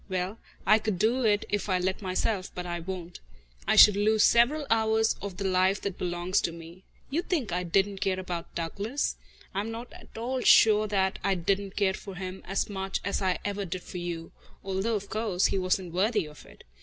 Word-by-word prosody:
Well, 185 Hz, +3 st, -2 dB, 0.3 s
I 215 Hz, +3 st, +6 dB
could 215 Hz, -3 st, -2 dB
do 230 Hz, +6 st, +2 dB
it 205 Hz, -1 st, +2 dB
if 205 Hz, 0 st, -2 dB
I 185 Hz, -, +3 dB
let 185 Hz, +3 st, -1 dB
myself, 190 Hz, +1 st, -1 dB
but 180 Hz, -, -4 dB
I 175 Hz, -1 st, -3 dB
won't. 175 Hz, 0 st, -7 dB, 0.5 s
I -, -, +3 dB
should 210 Hz, -, +9 dB
lose 215 Hz, +1 st, +3 dB
several 275 Hz, +6 st, +4 dB
hours 220 Hz, 0 st, +3 dB
of 195 Hz, -3 st, -6 dB
the 200 Hz, -, -3 dB
life 190 Hz, +1 st, +2 dB
that 195 Hz, -2 st, -4 dB
belongs 175 Hz, +2 st, 0 dB
to 170 Hz, -, -1 dB
me. 165 Hz, +2 st, -11 dB, 0.3 s
You 315 Hz, +5 st, +1 dB
think 310 Hz, -, -2 dB
I 180 Hz, +1 st, 0 dB
didn't 195 Hz, +3 st, 0 dB
care 190 Hz, -1 st, 0 dB
about 175 Hz, -2 st, -6 dB
Douglas? 200 Hz, -, -2 dB, 0.4 s
I 195 Hz, -, -1 dB
am 210 Hz, +3 st, -3 dB
not 230 Hz, +2 st, -7 dB
at -, -, -14 dB
all 250 Hz, +3 st, -2 dB
sure 215 Hz, -2 st, +6 dB
that 190 Hz, -2 st, 0 dB
I 195 Hz, -1 st, +2 dB
didn't 195 Hz, +2 st, -1 dB
care 195 Hz, -2 st, +2 dB
for 195 Hz, 0 st, -8 dB
him 185 Hz, 0 st, -6 dB
as 195 Hz, +2 st, 0 dB
much 195 Hz, -1 st, -3 dB
as 200 Hz, -, -1 dB
I 185 Hz, -2 st, +1 dB
ever 205 Hz, 0 st, -2 dB
did 185 Hz, -1 st, -5 dB
for 180 Hz, -, -7 dB
you, 170 Hz, -1 st, -5 dB, 0.3 s
although, 195 Hz, +4 st, -1 dB
of 200 Hz, -1 st, -4 dB
course, 215 Hz, -4 st, 0 dB
he 195 Hz, -, +1 dB
wasn't 185 Hz, -1 st, -1 dB
worthy 205 Hz, +1 st, +1 dB
of 150 Hz, 0 st, -14 dB
it. -, -, -16 dB
195 Hz, 210 wpm, -28 LUFS, 185-215 Hz, 0.5 s, should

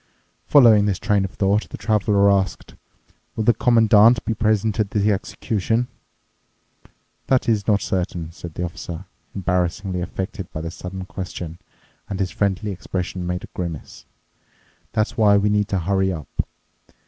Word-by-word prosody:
Following 115 Hz, -7 st, +7 dB
this 100 Hz, -3 st, 0 dB
train 100 Hz, 0 st, +1 dB
of -, -, -4 dB
thought, 100 Hz, +3 st, 0 dB
the -, -, -7 dB
Traveler 100 Hz, -2 st, +3 dB
asked, 95 Hz, -2 st, -1 dB, 0.6 s
"Will 110 Hz, -, -1 dB
the 120 Hz, -, +5 dB
Commandant 115 Hz, -1 st, +5 dB
be 115 Hz, -, 0 dB
present 110 Hz, 0 st, +1 dB
at 105 Hz, -2 st, +1 dB
the 105 Hz, +1 st, +2 dB
execution?" 110 Hz, +4 st, -1 dB, 1.4 s
"That 130 Hz, -1 st, +2 dB
is 105 Hz, -3 st, +1 dB
not 105 Hz, -2 st, +3 dB
certain," 85 Hz, -3 st, -2 dB
said 85 Hz, -1 st, -10 dB
the 90 Hz, -, -3 dB
Officer, 85 Hz, +1 st, -6 dB, 0.3 s
embarrassingly 90 Hz, 0 st, -1 dB
affected 95 Hz, +1 st, -5 dB
by 80 Hz, -, -5 dB
the 85 Hz, 0 st, -5 dB
sudden 95 Hz, +1 st, -7 dB
question, 90 Hz, -3 st, -6 dB, 0.5 s
and 95 Hz, -2 st, -4 dB
his 95 Hz, -2 st, -1 dB
friendly 100 Hz, +1 st, -1 dB
expression 90 Hz, -1 st, -4 dB
made 90 Hz, 0 st, -3 dB
a -, -, -8 dB
grimace. 85 Hz, -5 st, -6 dB, 0.8 s
"That's 110 Hz, -1 st, -1 dB
why 105 Hz, -2 st, +5 dB
we 100 Hz, +1 st, +2 dB
need 105 Hz, -1 st, +1 dB
to 100 Hz, -, -1 dB
hurry 95 Hz, +2 st, +1 dB
up. 80 Hz, -6 st, -4 dB
100 Hz, 150 wpm, -22 LUFS, 90-105 Hz, 1.4 s, Following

